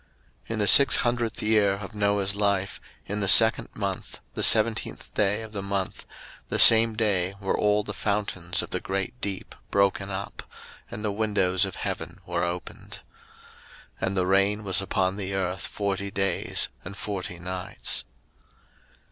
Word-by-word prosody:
01:007:011 - - -25
In - - -3
the 105 -1 0
six 140 +6 +8
hundredth 120 -2 0
year 105 -2 +3
of 100 0 -7
Noah's 100 -1 0
life, 100 -2 -1 0.2
in 105 +1 -4
the 100 - -1
second 110 +3 +5
month, 100 -3 -5
the - - -4
seventeenth 110 0 +3
day 105 +2 0
of 110 - -10
the 100 -2 -5
month, 100 -1 -4 0.4
the - - -1
same 115 0 +7
day 100 -4 0
were 95 -1 -1
all 105 0 +1
the 105 - -6
fountains 100 -4 -2
of - - -10
the 90 - -1
great 95 +6 -4
deep 100 -2 -4 0.2
broken 100 0 +1
up, 100 +1 -6 0.5
and 105 - -7
the 105 - 0
windows 100 -3 +1
of 95 - -6
heaven - - -5
were - - -2
opened. 90 0 -6 1.0
01:007:012 95 - 0
And 95 +1 -2
the 90 - +1
rain 100 +3 +2
was 95 -1 +3
upon 95 0 -1
the 95 -1 -4
earth 95 0 -2
forty 100 -1 -3
days 95 0 -1
and 100 - -9
forty 95 -4 -5
nights. 90 +1 -4
100 Hz, 165 wpm, -25 LUFS, 95-105 Hz, 1.0 s, six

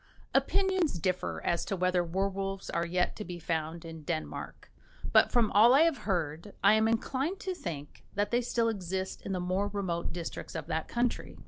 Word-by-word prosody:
Opinions 380 -4 +2
differ 185 +2 -1
as 170 - +1
to 195 - -1
whether 180 -1 +2
werwolves 195 +2 -2
are 170 0 0
yet 180 +1 +1
to 215 - -4
be 180 -3 -6
found 165 0 -3
in 165 -1 -8
Denmark, 155 +1 -5 0.4
but, - - +6
from 235 -4 +3
all 230 +5 +7
I 285 - +7
have 325 -3 +4
heard, 170 +1 -2
I - - +7
am 220 0 +4
inclined 270 - 0
to 380 -5 -2
think 155 - -7
that 205 +1 0
they 240 +1 +3
still 235 -1 +1
exist 190 -3 -3
in - - -5
the 185 - -1
more 185 +3 0
remote 190 -4 -2
districts 170 -1 -6
of - - -3
that 160 - -2
country. 240 0 -1
190 Hz, 190 wpm, -30 LUFS, 170-230 Hz, 0.4 s, all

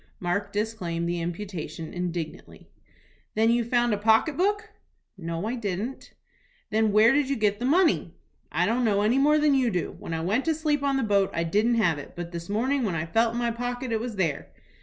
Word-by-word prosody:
Mark 200 +3 -2
disclaimed 195 -6 -2
the 170 0 -2
imputation 170 -2 -5
indignantly. 175 -3 -6 0.6
"Then 225 +1 +3
you 235 0 +2
found 240 0 +1
a 205 - -1
pocket 225 +8 +3
book?" 415 +5 0 0.4
"No, 170 0 -4
I 225 - -2
didn't." 220 +2 -4 0.6
"Then 220 0 +2
where 215 +4 +6
did 280 -1 +1
you 275 - +1
get 210 -3 +1
the 245 - -2
money?" 310 - +2 0.4
"I 170 +4 +1
don't 235 +5 +1
know 205 -3 +2
any 235 +5 +3
more 300 +2 +4
than 300 -1 +3
you 260 -3 +3
do. 180 -7 -2
When 165 - -5
I 160 - -2
went 205 +10 0
to 325 -1 +1
sleep 300 -2 0
on 280 -1 +1
the 265 - 0
boat 200 -3 +2
I 170 - 0
didn't 210 +8 +2
have 175 -9 +2
it, 145 - -10
but 175 0 -6
this 170 0 -7
morning 255 +7 0
when 200 -8 -1
I 155 0 -2
felt 225 +6 +1
in 240 - -2
my 240 -1 0
pocket 245 +1 -4
it 225 - +1
was 235 -1 -5
there." 165 -7 -1
220 Hz, 215 wpm, -26 LUFS, 175-250 Hz, 0.6 s, where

